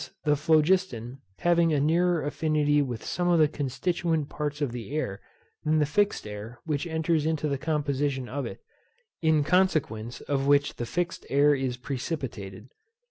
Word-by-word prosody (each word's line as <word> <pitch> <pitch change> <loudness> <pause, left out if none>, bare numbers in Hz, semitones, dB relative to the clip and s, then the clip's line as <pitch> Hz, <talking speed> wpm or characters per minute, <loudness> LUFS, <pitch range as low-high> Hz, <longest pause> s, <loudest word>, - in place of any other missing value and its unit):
the 150 -1 +3
phlogiston 150 -5 +1 0.2
having 170 -1 +3
a 150 - +2
nearer 170 +3 +2
affinity 150 -1 +2
with 125 -5 -4
some 175 0 -1
of 175 -1 +4
the 155 -2 +5
constituent 160 +2 -1
parts 150 -1 -3
of 145 -5 -1
the 120 -1 -6
air 100 -10 -2 0.4
than 155 +1 +2
the 150 - +3
fixed 205 +7 +1
air 105 +3 -8
which 155 +1 -1
enters 160 -1 +1
into 155 -1 0
the 140 - 0
composition 140 -3 -1
of 140 +2 -3
it, - - -9 0.6
in 160 -2 +3
consequence 145 - +1
of 140 -1 -1
which 145 0 +3
the 120 - -3
fixed 175 +4 -2
air 145 +1 +5
is 130 -3 -1
precipitated. 125 - -5
145 Hz, 160 wpm, -27 LUFS, 135-160 Hz, 0.6 s, the